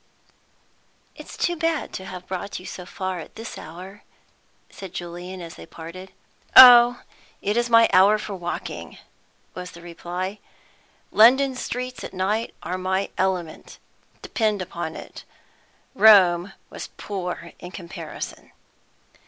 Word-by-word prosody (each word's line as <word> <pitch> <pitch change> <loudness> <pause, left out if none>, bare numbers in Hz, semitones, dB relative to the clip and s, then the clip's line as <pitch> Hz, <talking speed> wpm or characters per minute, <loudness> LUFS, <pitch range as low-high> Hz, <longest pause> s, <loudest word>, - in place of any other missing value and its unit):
"It's - - -11
too 345 - 0
bad 330 -1 -1
to 190 - -6
have 180 -1 -8
brought 190 +2 -5
you 180 - -13
so 180 -1 -8
far 185 -1 -4
at 160 - -11
this 225 0 -8
hour," 185 +6 -10 0.7
said 190 -2 -10
Julian, 175 +2 -7
as 165 -1 -8
they - - -11
parted. 185 +4 -10 0.4
"Oh, 245 -1 +10 0.4
it 205 +2 -1
is 240 0 +1
my 230 -1 +6
hour 195 +3 +6
for 210 -1 -6
walking," 175 -2 -6 0.6
was 180 0 -7
the 170 - -13
reply. 180 +3 -5 0.7
"London 260 +5 +6
streets 250 0 -5
at - - -8
night 210 +5 -1
are 185 +1 -3
my 190 +1 -1
element. 180 -4 -3 0.5
Depend 215 -3 0
upon 170 -3 -5
it, - - -10 0.7
Rome 195 -5 +6 0.2
was - - -7
poor 180 -4 -5
in 175 - -9
comparison!" 180 -2 -8
190 Hz, 130 wpm, -23 LUFS, 180-220 Hz, 0.7 s, Oh